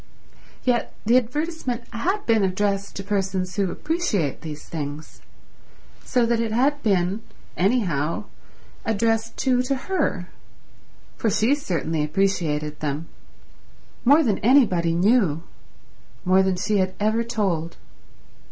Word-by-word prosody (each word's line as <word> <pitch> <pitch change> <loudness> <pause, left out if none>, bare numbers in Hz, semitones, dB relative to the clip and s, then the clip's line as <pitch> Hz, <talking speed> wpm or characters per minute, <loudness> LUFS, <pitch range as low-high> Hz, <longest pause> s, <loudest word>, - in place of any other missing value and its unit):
Yet 245 -2 0
the 230 +3 +4
advertisement 255 0 -1
had 375 - -1
been 225 -3 +3
addressed 200 +1 0
to 195 - -5
persons 190 -2 -1
who 200 -3 +1
appreciate 260 - -1
these 150 -2 -8
things, 150 -1 -6 0.8
so 245 -2 +2
that 230 0 +1
it 230 -1 -1
had 280 +6 +2
been, 195 -2 +1 0.3
anyhow 180 - +1 0.6
addressed 225 +1 0
too 255 -2 +2
to 265 +2 0
her, 270 - -1 0.9
for 225 - +1
she 220 +6 +3
certainly 165 - -1
appreciated 150 -3 0
them; 150 +2 -3 0.9
more 290 +6 +6
than 215 -7 +1
anybody 200 -10 +4
knew; 180 -5 +3 0.8
more 185 +1 +5
than 190 -1 +1
she 210 +3 0
had 185 -1 0
ever 220 +2 +1
told. 190 -8 -2
205 Hz, 120 wpm, -23 LUFS, 175-240 Hz, 0.9 s, more